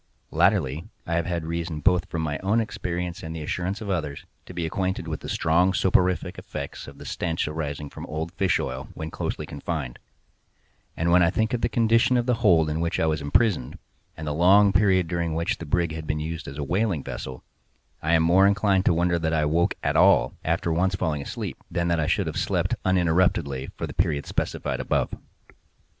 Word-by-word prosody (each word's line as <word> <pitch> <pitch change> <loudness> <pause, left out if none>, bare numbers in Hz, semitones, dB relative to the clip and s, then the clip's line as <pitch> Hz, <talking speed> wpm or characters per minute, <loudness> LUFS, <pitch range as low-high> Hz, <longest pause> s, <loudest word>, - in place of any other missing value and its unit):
Latterly, 75 +10 +1 0.2
I 85 - -3
have 85 0 0
had 85 -2 -2
reason 85 -1 -3
both 90 +3 +3
from 80 -1 -2
my 75 -3 -2
own 100 +5 +1
experience 90 -4 -3
and 80 -1 -6
the 80 - -5
assurance 90 +7 -3
of 105 - -5
others, 75 -6 -3 0.2
to - - -9
be 85 -2 -2
acquainted 95 +3 -2
with - - -3
the - - -8
strong 90 +4 +2
soporific 90 -1 +1
effects 70 - -7
of - - -11
the - - -11
stench 80 -3 -2
arising 75 -1 -4
from - - -9
old 80 +2 -4
fish 95 -3 +1
oil 65 +1 -4
when 80 0 -5
closely - - -3
confined; - - -5 1.0
and 85 +1 +1
when 90 +1 +6
I 85 - +5
think 110 +5 0
of 120 - 0
the - - +1
condition 115 +2 +3
of 120 - +1
the 125 - +2
hold 85 -8 +5
in 75 +1 -2
which 85 0 -1
I - - +2
was 80 -1 0
imprisoned, 75 - +1 0.4
and 80 - -6
the 75 - -1
long 95 +5 +5
period 95 -3 +3
during 85 -1 -2
which 85 +1 -1
the 80 - -7
brig 85 +2 +1
had 80 -1 -6
been 75 - -1
used 80 +1 -5
as 70 - -7
a 75 - -2
whaling 90 -2 0
vessel, 65 -1 -7 0.6
I 80 +2 +1
am 80 - +4
more 90 +4 +5
inclined 100 -1 +2
to 85 - +4
wonder 85 0 +2
that 80 0 0
I 80 - +2
awoke 80 +3 +1
at - - 0
all, - - +5
after 85 - 0
once 95 +3 +1
falling 75 -5 -1
asleep, - - -5
than 85 0 -1
that 85 -1 +1
I 75 - 0
should - - +1
have - - -4
slept - - 0
uninterruptedly 85 -7 +1
for - - -3
the - - -7
period 70 -2 0
specified - - -2
above. - - 0
85 Hz, 210 wpm, -25 LUFS, 80-95 Hz, 1.0 s, when